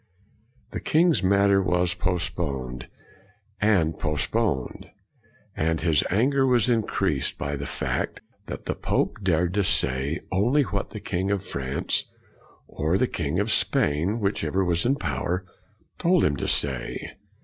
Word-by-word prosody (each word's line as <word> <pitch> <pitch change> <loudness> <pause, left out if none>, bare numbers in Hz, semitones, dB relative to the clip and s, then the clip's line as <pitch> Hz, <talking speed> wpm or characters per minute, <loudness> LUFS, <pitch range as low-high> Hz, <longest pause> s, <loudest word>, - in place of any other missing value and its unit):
The - - -4
king's 165 +1 +3
matter 100 0 +4
was 90 -1 +1
postponed 85 -8 -3 0.7
and 95 -7 +2
post 75 -3 -1
poned; 105 - -1 0.7
and 80 +1 0
his 80 -4 +2
anger 135 +7 +2
was 125 -3 +3
increased 100 - 0
by 70 +1 -3
the 70 0 -5
fact - - -3 0.2
that - - -7
the - - -1
pope - - -1
dared 90 -2 +1
to 100 0 +2
say 70 0 +1
only 120 +10 +3
what 100 -5 -3
the 105 - -7
king 95 -2 -2
of 100 -1 0
France 65 -6 -2 0.6
or 80 +5 0
the 130 - +3
king 75 - -2
of 105 +2 0
Spain, 85 +9 +1
whichever 95 -3 0
was 85 +4 +1
in 135 - +3
power, 85 - -2 0.5
told 175 +1 +3
him 70 - +2
to - - -3
say. - - -1
90 Hz, 140 wpm, -25 LUFS, 75-105 Hz, 0.7 s, matter